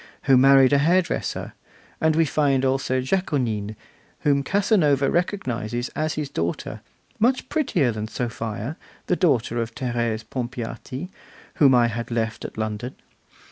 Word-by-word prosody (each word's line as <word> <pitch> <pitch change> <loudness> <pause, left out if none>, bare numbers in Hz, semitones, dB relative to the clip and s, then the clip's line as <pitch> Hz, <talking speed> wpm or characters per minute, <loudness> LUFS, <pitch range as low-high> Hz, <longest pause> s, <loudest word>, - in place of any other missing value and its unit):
who 135 - +5
married 135 +1 +6
a 140 - +5
hairdresser; 170 +4 0 0.5
and 160 -1 +3
we 165 0 +4
find 140 -3 +1
also 130 -1 +1
Jaconine, 125 - -1 0.5
whom 140 -1 +2
Casanova 150 - +2
recognises 120 - -2
as 155 0 -2
his 150 -1 -2
daughter, 85 -9 -3 0.4
'much 250 +4 +2
prettier 250 - +1
than 110 -1 -4
Sophia, 115 +3 -4 0.3
the 180 - +1
daughter 120 -9 +1
of 115 0 -5
Thérèse 120 -3 -2
Pompeati, 125 +4 -5 0.5
whom 135 -4 +6
I 120 -1 +5
had 115 0 -3
left 115 -2 -2
at - - -8
London. 110 +3 -4
130 Hz, 135 wpm, -23 LUFS, 115-155 Hz, 0.5 s, married